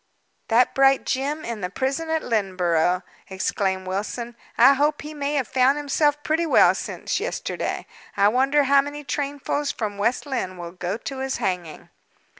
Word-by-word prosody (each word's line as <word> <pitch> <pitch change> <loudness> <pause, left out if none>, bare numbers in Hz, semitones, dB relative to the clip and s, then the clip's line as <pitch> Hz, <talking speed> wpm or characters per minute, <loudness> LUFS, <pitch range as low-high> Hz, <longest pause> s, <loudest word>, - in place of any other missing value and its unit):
"That 240 +2 +3
bright 270 0 +4
gem 285 +4 -2
in 230 -3 -5
the 180 - -2
prison 270 - -2
at 320 0 0
Lynneborough," 180 -5 +1 0.3
exclaimed 190 0 -1
Wilson. 215 +5 -4 0.2
"I 250 +4 +8
hope 295 +2 +1
he 305 +1 -7
may 290 0 -2
have 265 -5 0
found 265 +2 +3
himself 295 0 +1
pretty 325 +2 0
well - - +6
since - - -3
yesterday! - - -3 0.3
I 200 - +5
wonder 270 +5 +3
how 275 0 +5
many 290 +1 -7
trainfuls 285 +1 -2
from 205 -3 -4
West 235 +8 0
Lynne 240 -10 -3
will 170 -1 -7
go 180 +2 -4
to 265 +3 -6
his 265 0 -2
hanging?" 175 -4 -4
260 Hz, 165 wpm, -23 LUFS, 195-285 Hz, 0.3 s, I